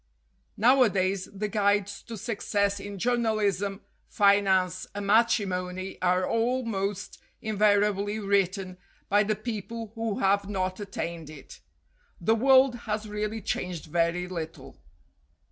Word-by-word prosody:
Nowadays 200 -6 +3
the 205 +1 -3
guides 205 -1 0
to 230 - -6
success 200 -2 -1
in 200 0 -7
journalism, 210 -4 0 0.3
finance, 190 -3 +2
and 205 0 -4
matrimony 195 -4 +1
are 180 0 +2
al 245 +3 0
most 200 -3 -3 0.2
invariably 205 -1 +1
written 195 -2 0 0.3
by 205 +1 +4
the 215 0 0
people 225 0 -6
who 225 -3 -3
have 200 +1 +1
not 185 -1 -2
attained 170 -5 -5
it. 155 - -12 0.6
The 225 - +2
world 260 +2 +5 0.2
has 215 0 -2
really 210 +1 -3
changed 180 -3 -3
very 170 +2 0
little. 165 -3 -7
200 Hz, 115 wpm, -27 LUFS, 185-215 Hz, 0.6 s, world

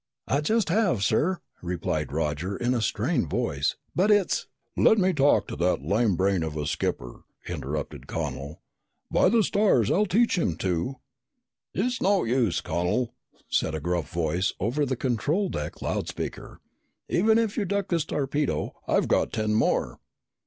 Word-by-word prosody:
"I 140 - +1
just 220 +5 +1
have, 175 - +2
sir," 155 - +1 0.2
replied 85 -4 -2
Roger 80 +5 -2
in 120 +1 0
a 120 - 0
strained 105 - 0
voice. 70 0 0 0.2
"But 190 +4 +3
it's 205 -3 +2 0.2
" - - -50
"Let 220 - +5
me 190 -2 +3
talk 145 -2 +3
to - - -4
that 85 -3 +1
lame 100 +4 +2
brain 95 0 +1
of 80 -1 -3
a 75 - -2
skipper," - - -3 0.3
interrupted 75 -3 -5
Connel. 70 +4 -5 0.5
"By - - +4
the 225 +1 +4
stars, 200 - +3
I'll 210 +3 +3
teach 215 +1 +2
him 85 - 0
to 90 +8 -1 0.4
" 245 - -58
"It's 245 +5 0
no 195 -1 +3
use, 115 -7 +1
Connel," 90 +9 -1 0.3
said 80 - 0
a - - -2
gruff 85 -2 -2
voice 85 +2 0
over 135 +8 0
the 130 - 0
control 145 - 0
deck 75 - -5
loud - - -2
speaker. - - -6 0.5
"Even 220 +5 +3
if 225 -2 +1
you 220 - 0
duck 200 0 -1
this 170 -3 +1
torpedo, 145 -1 -1
I've - - +2
got - - +2
ten 110 -1 0
more!" 110 - +1
120 Hz, 165 wpm, -26 LUFS, -, 0.5 s, Let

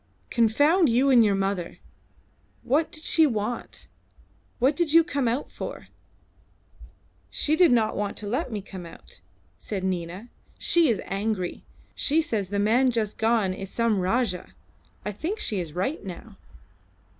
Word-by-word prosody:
"Confound 290 - +3
you 255 +4 +3
and 240 -3 +7
your 205 -2 +2
mother! 195 -3 -2 0.9
What 305 +6 +1
did 310 -2 -5
she 320 -2 +4
want? 230 -1 -4 0.7
What 265 +4 +2
did 320 -1 0
you 330 0 +8
come 285 -6 -1
out 245 +5 -2
for?" - - -7 1.4
"She 305 - +1
did 345 -3 +5
not 220 -3 +2
want 205 0 -3
to 210 - -5
let 255 +6 -2
me 210 -3 -4
come 185 -3 -9
out," - - -15 0.4
said 195 -3 -4
Nina. 185 +4 -4 0.3
"She 335 -4 +3
is 225 - +1
angry. 195 -2 -2 0.3
She 300 +3 +1
says 220 - 0
the 200 +2 -3
man 230 +6 +3
just 225 -4 -2
gone 220 -4 +2
is 195 0 -6
some 230 -2 +1
Rajah. 185 0 -1 0.5
I 210 - -2
think 325 - -4
she 210 - -1
is 165 -4 -5
right 195 - -2
now." 200 +3 -9
225 Hz, 155 wpm, -25 LUFS, 195-275 Hz, 1.4 s, you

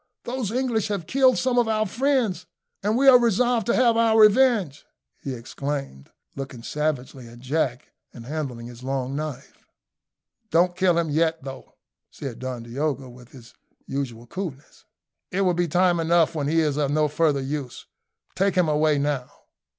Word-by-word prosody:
"Those 245 -4 -3
English 240 -3 0
have 200 -5 -3
killed 260 +6 +3
some 250 -1 +1
of 240 - +2
our 215 -1 +1
friends, 230 - 0 0.3
and 210 +3 +1
we 275 +1 +3
are 255 -2 +9
resolved 240 -1 +1
to 235 - +2
have 240 -3 +4
our 225 -1 +4
revenge," 215 - +4 0.4
he 135 -2 -4
exclaimed, 135 - -5 0.3
looking 135 -4 -7
savagely 140 -3 -3
at 115 +1 -13
Jack, 130 0 -2 0.2
and 115 -2 -11
handling 135 -5 -5
his 120 0 -11
long 135 0 -3
knife. 150 -2 -6 0.9
"Don't 175 +2 +2
kill 185 -2 +2
him 165 -3 0
yet, 160 0 +1
though," 135 -1 -9 0.3
said 135 -5 -7
Don 125 -2 -5
Diogo, 135 +2 -3
with 125 0 -15
his 125 -3 -15 0.3
usual 125 -4 -4
coolness; 150 -1 -8 0.4
"it 190 - -1
will 185 -2 +3
be 175 0 0
time 175 +1 +2
enough 165 0 +3
when 145 -3 -2
he 165 +2 +2
is 150 -2 0
of 145 -2 +1
no 150 +1 +2
further 150 -1 +1
use. 135 -2 -5 0.5
Take 195 0 +1
him 180 -3 +3
away 150 0 +2
now." 140 -3 -1
155 Hz, 165 wpm, -24 LUFS, 135-200 Hz, 0.9 s, are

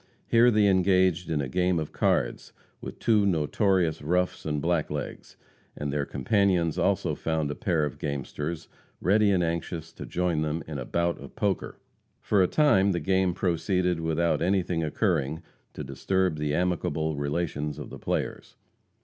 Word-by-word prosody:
Here 115 +1 +5
they 105 -3 +3
engaged 95 -2 +3
in 75 -2 0
a 70 - -3
game 90 +5 +1
of 75 - -4
cards - - 0 0.3
with - - -7
two 110 -3 +3
notorious 90 -1 +1
roughs 90 +3 -1
and 75 -1 -1
blacklegs; 75 -2 -3 0.4
and 75 -1 -4
their 75 -1 -1
companions 90 - +1
also - - +1
found 80 -3 -1
a - - -4
pair 85 -9 0
of 75 - -6
gamesters, 75 +3 -4 0.3
ready 105 +3 +3
and 95 -3 +2
anxious 80 0 -3
to - - -8
join 90 -3 0
them 80 +1 -2
in 75 -3 -5
a 65 - -5
"bout 85 0 -1
of - - -11
poker." 100 -2 -1 0.4
For 100 -2 +2
a 90 - +4
time 100 - +3
the 85 - -1
game 95 -1 +1
proceeded 90 0 0
without 80 -1 0
anything 90 -2 +1
occurring 80 -3 0 0.3
to - - -6
disturb 90 +6 0
the 75 0 -1
amicable 80 -3 -1
relations 75 0 -2
of 75 - -8
the - - -8
players. - - -3
85 Hz, 160 wpm, -27 LUFS, 75-95 Hz, 0.4 s, Here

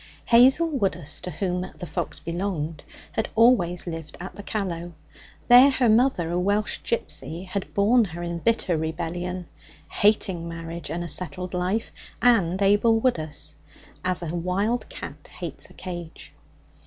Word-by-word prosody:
Hazel 260 +8 +6
Woodus, 195 - -1
to - - -3
whom 180 +1 -2 0.2
the 175 - -6
fox - - -3
belonged, 165 -3 -3 0.3
had 220 - -2
always 220 -7 +4
lived 165 -3 -6
at 185 +2 -7
the - - -9
Callow. 175 -5 -3 0.5
There 250 +3 +9
her 260 -3 +2
mother, 215 -7 +3
a 175 - 0
Welsh 205 +3 +1
gipsy, 180 -6 -3
had 190 +1 -4
born 220 +4 +4
her 175 -2 -7
in 170 0 -3
bitter 195 -3 +1
rebellion, 175 +3 -3 0.5
hating 195 -5 +2
marriage 165 -1 -6
and 175 +1 -3
a - - -4
settled 180 +3 -2
life 185 +5 -1 0.3
and 195 -7 +3
Abel 205 +3 +4
Woodus 160 - -2 0.5
as 185 -1 0
a 165 -1 -4
wild 190 +7 -1
cat - - -9
hates - - -7
a - - -16
cage. 175 -3 -8
180 Hz, 145 wpm, -25 LUFS, 170-215 Hz, 0.5 s, There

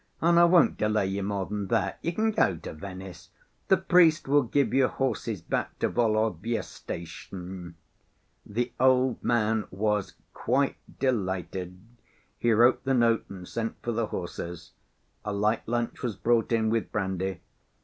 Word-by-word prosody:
And 170 +1 +4
I 170 - +8
won't 170 -2 +4
delay 105 -1 +1
you 95 +1 -2
more 100 -1 -2
than 105 -1 -4
that. - - 0
You 170 - -1
can 220 +5 +1
go 95 - +2
to - - -8
Venice. 95 0 -9 0.4
The 190 - +5
priest 175 -4 +4
will 145 +1 +5
give 130 -1 0
you 130 -1 +4
horses 115 -8 -2
back - - -2
to - - 0
Volovya 110 0 0
station." 90 +1 -8 0.7
The 120 +3 -3
old 130 -1 +3
man 110 -2 +1
was 105 0 -1 0.2
quite 135 +4 0 0.2
delighted. 95 -7 -2 0.6
He 120 - +2
wrote 120 +3 +4
the 135 0 +1
note, 115 -2 +3
and 90 -2 -9
sent 115 -1 -3
for 120 - -1
the 115 -1 -1
horses. 85 -2 -6 0.5
A 105 - -3
light 105 +2 0
lunch 120 0 -2
was 120 -6 -2
brought 115 +3 +1
in, 110 -1 +2
with 115 -1 -1
brandy. 95 -2 -2
110 Hz, 155 wpm, -27 LUFS, 95-125 Hz, 0.7 s, I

